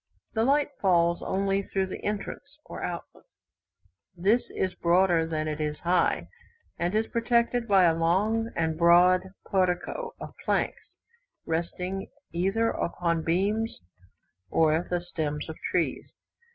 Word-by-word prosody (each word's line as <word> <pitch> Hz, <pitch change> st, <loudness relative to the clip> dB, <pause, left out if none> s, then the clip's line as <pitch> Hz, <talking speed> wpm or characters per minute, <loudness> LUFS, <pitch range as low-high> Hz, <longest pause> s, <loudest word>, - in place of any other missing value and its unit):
The 220 Hz, -2 st, +1 dB
light 285 Hz, +3 st, +2 dB
falls 170 Hz, -3 st, +3 dB
only 195 Hz, +1 st, 0 dB
through 195 Hz, 0 st, -1 dB
the 190 Hz, -, -7 dB
entrance, 210 Hz, +8 st, -5 dB
or -, -, -8 dB
outlet. -, -, -6 dB, 0.9 s
This 205 Hz, +8 st, +3 dB
is 185 Hz, -1 st, -2 dB
broader 170 Hz, -1 st, +3 dB
than 155 Hz, -1 st, -2 dB
it 155 Hz, 0 st, -3 dB
is 150 Hz, 0 st, -2 dB
high, 175 Hz, 0 st, +1 dB, 0.5 s
and 175 Hz, +4 st, 0 dB
is 220 Hz, +1 st, +2 dB
protected 235 Hz, +1 st, +1 dB
by 195 Hz, -3 st, +5 dB
a 170 Hz, -2 st, +5 dB
long 200 Hz, +8 st, +1 dB
and 160 Hz, 0 st, -1 dB
broad 175 Hz, +2 st, +6 dB, 0.2 s
portico 185 Hz, -, -1 dB
of -, -, -8 dB
planks, -, -, 0 dB, 0.6 s
resting 180 Hz, +3 st, -3 dB, 0.3 s
either 195 Hz, +6 st, +1 dB
upon 170 Hz, -1 st, -1 dB
beams 205 Hz, +7 st, 0 dB, 0.7 s
or 160 Hz, +1 st, +2 dB
the 175 Hz, -1 st, 0 dB
stems 155 Hz, -4 st, -3 dB
of 160 Hz, -, -6 dB
trees. -, -, -1 dB
180 Hz, 130 wpm, -27 LUFS, 170-210 Hz, 0.9 s, broad